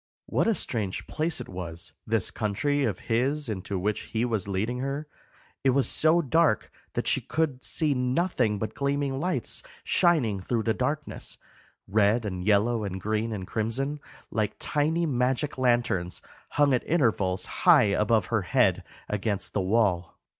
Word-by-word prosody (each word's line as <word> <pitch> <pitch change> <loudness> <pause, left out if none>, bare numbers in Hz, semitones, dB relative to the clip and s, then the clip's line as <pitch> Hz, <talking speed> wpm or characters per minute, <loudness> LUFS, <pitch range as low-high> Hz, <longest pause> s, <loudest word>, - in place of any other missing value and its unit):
What - - +1
a 225 - +3
strange 105 - -2
place 160 +1 -1
it - - -6
was, 85 -2 -7
this 110 -3 +1
country 135 +7 0
of 105 -5 -2
his 135 +6 0
into 100 -2 -3
which 105 +3 -1
he 115 +1 -2
was 110 -6 -1
leading 110 +6 -1
her! 140 +3 -3 0.6
It 135 - +4
was 140 - +2
so 165 +2 +3
dark 160 -3 +2 0.2
that - - -1
she - - +2
could 150 -5 -1
see 155 -3 +1
nothing 125 - +1
but 110 +1 -4
gleaming 140 -1 -1
lights 150 -7 -1 0.2
shining 145 - +2
through 110 +4 -1
the 110 - +1
darkness, 145 +6 -3 0.5
red 110 +3 +3
and 90 -3 -3
yellow 110 +3 +2
and 95 -2 -4
green 110 +3 -1
and 100 -4 -4
crimson, 130 +9 -2 0.3
like 110 -2 -1
tiny 160 +3 0
magic 130 0 0
lanterns 120 -8 +1 0.3
hung 145 -2 +3
at 125 - +2
intervals 110 - +1 0.2
high - - +7
above 105 -1 +2
her 110 - +3
head 90 - +2 0.2
against 105 -1 -2
the 100 - +1
wall. 95 -3 +1
115 Hz, 155 wpm, -27 LUFS, 105-140 Hz, 0.6 s, high